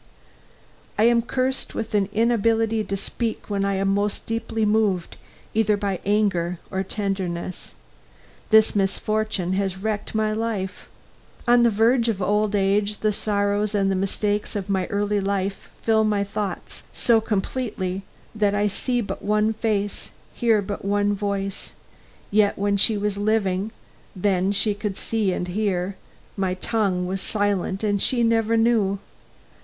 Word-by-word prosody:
I 215 - +3
am 235 0 +5
cursed 260 +2 -2
with 225 - -4
an 200 -2 +2
inability 225 0 +2
to 195 -1 -3
speak 220 +2 -4
when 200 -1 0
I 200 0 +1
am 195 0 +1
most 205 +1 -1
deeply 225 -1 -1
moved, 210 -5 +1 0.4
either 215 -1 +2
by 200 -3 -2
anger 195 -4 +1
or 190 -1 -1
tenderness. 190 -3 -4 0.7
This 220 -1 +5
misfortune 200 -1 0
has 190 -1 -1
wrecked 210 +2 -3
my 215 0 +1
life. 215 -4 -3 0.6
On 240 0 +6
the 235 - +5
verge 230 +3 +3
of 210 -4 -1
old 210 +2 +1
age, 200 +1 +1
the 215 - +2
sorrows 205 0 0
and 195 -1 +2
the - - +1
mistakes 205 +2 -1
of 200 -1 -3
my 190 -2 0
early 205 0 0
life 195 0 -2
fill 220 -1 +3
my 210 -2 +1
thoughts 200 0 -5
so 230 -2 +3
completely 205 -3 -2 0.3
that 205 -2 +1
I 205 0 +2
see 245 +4 0
but 205 - -5
one 210 +1 +2
face, 210 -2 -2 0.2
hear 225 -4 +2
but 200 +1 -5
one 205 +1 +1
voice; 200 -1 -3 0.6
yet 205 0 +3
when 200 0 +1
she 210 +2 +4
was 205 0 -1
living 205 -2 +1 0.5
when 190 0 +2
she 205 +1 +2
could 205 -1 -4
see 220 -4 0
and 180 - -2
hear, 190 -1 -1 0.4
my 190 -2 -1
tongue 195 -3 0
was 190 +1 -3
silent 200 -1 0
and 205 -2 +1
she 240 -2 +2
never 230 0 +2
knew. 225 -4 +3
205 Hz, 150 wpm, -23 LUFS, 195-220 Hz, 0.7 s, On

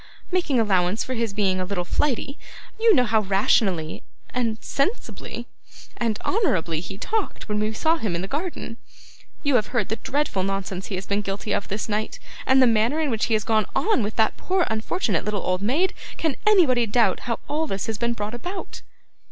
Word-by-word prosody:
Making 345 -8 +2
allowance 195 -1 +2
for 260 - -4
his 230 -3 -1
being 195 -2 +1
a - - 0
little 180 -1 -2
flighty, 275 +5 -1 0.4
you 450 -1 +6
know 250 - +5
how 220 -2 +3
rationally, 195 -4 +1 0.3
and 230 -3 0
sensibly, 275 - -2 0.5
and 225 -3 0
honourably 175 - +1
he 190 +3 -7
talked, 435 - -2
when 210 0 0
we 215 +1 0
saw 320 +9 +2
him 210 - -2
in 170 - -2
the - - -3
garden. 295 - -4 0.7
You 285 -4 +4
have 215 - 0
heard 235 -6 -1
the 220 - -1
dreadful 270 -5 -1
nonsense 195 -1 -3
he 195 - -3
has 185 +1 -4
been 200 +1 0
guilty 200 +1 -3
of 200 - -1
this 205 +2 -3
night, 215 0 -2 0.3
and 265 0 +6
the 260 - +7
manner 230 +5 +3
in 305 -4 +1
which 220 -1 +1
he 225 - +2
has 215 - 0
gone 220 -3 +2
on 430 - +3
with 210 0 -2
that 220 -1 +2
poor 375 -1 +1
unfortunate 220 - 0
little 210 -2 -2
old 185 0 0
maid. 290 - +2 0.2
Can 315 -5 0
anybody 275 - +5
doubt 230 +2 +3
how 230 - +1
all 315 +2 -1
this 195 -7 -2
has 220 -2 -3
been 235 0 +1
brought 210 -1 -4
about? 360 +11 -6
220 Hz, 200 wpm, -24 LUFS, 200-275 Hz, 0.7 s, the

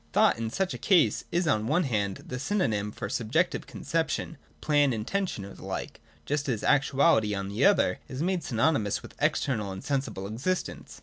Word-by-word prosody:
Thought - - +4
in 115 -1 -2
such 190 +10 -1
a - - -6
case 180 -6 +3
is, 175 0 +1
on 110 -6 +1
one 175 +7 +2
hand, 105 - -1
the 125 - -5
sj'nonym 120 - 0
for - - -6
a 100 - -5
subjective 115 -3 0
conception, - - -2 0.2
plan, 145 - +3
intention 115 - -2
or 100 - -10
the - - -13
like, - - -5 0.2
just 145 -1 -1
as 115 -5 -1
actuality, 135 -6 +3
on 100 0 -3
the 105 +6 +1
other, 200 0 +3
is 130 +4 -4
made 180 -2 0
synonymous 115 -4 +1
with - - -11
external 105 -8 0
and 95 0 -7
sensible 135 -9 -2
existence. 130 - -3
130 Hz, 185 wpm, -28 LUFS, 105-160 Hz, 0.2 s, Thought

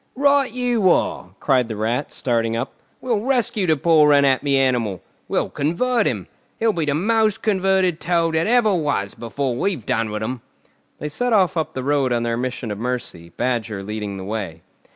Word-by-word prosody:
"Right 280 -1 +3
you 240 -5 +1
are!" 90 - +1
cried 130 -4 +2
the 110 - -5
Rat, 115 +6 -2
starting 115 -2 -1
up. 120 - -4 0.3
"We'll 240 -5 0
rescue 230 -5 0
the 160 -2 +3
poor 150 -1 +5
unhappy 140 0 +3
animal! 120 -9 0 0.2
We'll - - -1
convert 230 - +1
him! - - -2 0.3
He'll 225 -1 +2
be 165 -4 -1
the 145 -1 0
most 215 +4 +1
converted 190 -4 +2
Toad 170 -2 +1
that 160 +3 +1
ever 230 -3 +3
was 145 - -1
before 125 +2 -3
we've 150 - -2
done 115 -1 0
with 105 0 -4
him!" 125 +2 -4 0.6
They 150 - -5
set 245 +11 -1
off 190 -3 +3
up 160 -1 -2
the 130 - -3
road 140 -2 +1
on 120 -1 +1
their 115 0 0
mission 125 -2 -3
of 105 - -5
mercy, 120 -8 -4
Badger 115 -5 -2
leading 105 -1 -5
the 95 - -6
way. 95 -6 -5
140 Hz, 185 wpm, -21 LUFS, 115-190 Hz, 0.6 s, poor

